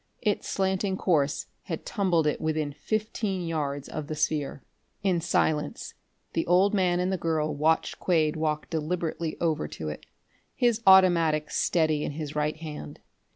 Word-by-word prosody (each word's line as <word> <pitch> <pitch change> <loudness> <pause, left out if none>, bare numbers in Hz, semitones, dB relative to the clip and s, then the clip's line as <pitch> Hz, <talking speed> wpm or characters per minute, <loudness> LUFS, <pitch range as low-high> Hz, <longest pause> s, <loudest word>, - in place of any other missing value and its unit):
Its 210 -3 0
slanting 190 0 0
course 150 -7 +1 0.2
had 165 -3 -5
tumbled 180 -6 +1
it 150 - 0
within 155 -2 -1
fifteen 210 +2 -2
yards 145 -4 -2
of 150 -2 -5
the 155 - -4
sphere. 150 -2 -1 0.4
In 180 -4 +2
silence 150 -3 0 0.4
the 165 - +1
old 185 +4 +4
man 180 -3 +2
and 180 +1 0
the - - 0
girl 155 -2 0
watched 155 +3 +1
Quade 160 -4 +2
walk 155 -1 -1
deliberately 165 0 -2
over 160 - 0
to 75 +1 -6
it, 75 - -8 0.5
his 240 -2 +2
automatic 170 -5 +5
steady 155 -3 +1
in - - -3
his 150 -1 -5
right 150 +1 0
hand. 150 - -8
160 Hz, 155 wpm, -27 LUFS, 150-180 Hz, 0.5 s, automatic